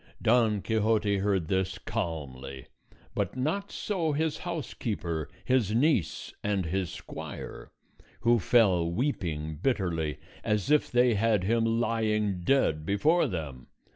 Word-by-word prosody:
Don 110 -3 +3
Quixote 110 -2 +2
heard 95 -4 +1
this 95 0 0
calmly; 70 -5 -5 0.5
but 100 +3 -2
not 180 +10 -1
so 170 -7 -1
his 155 +1 0
housekeeper, 105 - -3 0.2
his 120 -5 +2
niece, 125 - +1
and 100 -3 0
his 90 +1 -1
squire, - - -8 0.5
who 120 0 +4
fell 95 -5 +4
weeping 80 - -2
bitterly, 85 - 0 0.3
as 105 +4 0
if 150 - +4
they 125 -1 +4
had 105 -2 +2
him 115 +3 +2
lying 110 -4 0
dead 85 - +2
before 145 - +3
them. 75 -8 -5
105 Hz, 120 wpm, -29 LUFS, 85-120 Hz, 0.5 s, who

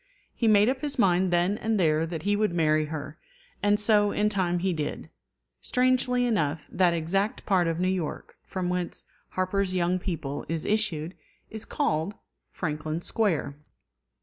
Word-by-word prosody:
He 230 - 0
made 210 -1 +6
up 260 +1 0
his 290 -1 -3
mind 185 -4 +3
then 175 +4 +1
and 220 -1 0
there 160 -2 +2
that 165 -2 -5
he 205 +1 +2
would 210 -4 0
marry 155 -2 +2
her; 150 0 -6 0.4
and 205 +1 +3
so 210 -1 +4
in 210 0 +1
time 185 -4 0
he 185 +1 0
did. 150 -3 -4 0.5
Strangely 250 0 +2
enough, 160 -10 0
that 175 -2 +3
exact 195 +6 -1
part 185 -4 +2
of 165 0 -1
New 180 - +1
York 185 -5 -3
from 185 -2 -4
whence 180 -1 -2 0.3
Harper's 185 0 0
Young 180 +1 +1
People 160 -6 -4
is 165 -1 -2
issued 180 -6 0 0.4
is 220 0 -6
called 190 - -1 0.4
Franklin 155 -1 -3
Square. 175 -9 0
185 Hz, 160 wpm, -27 LUFS, 160-210 Hz, 0.5 s, made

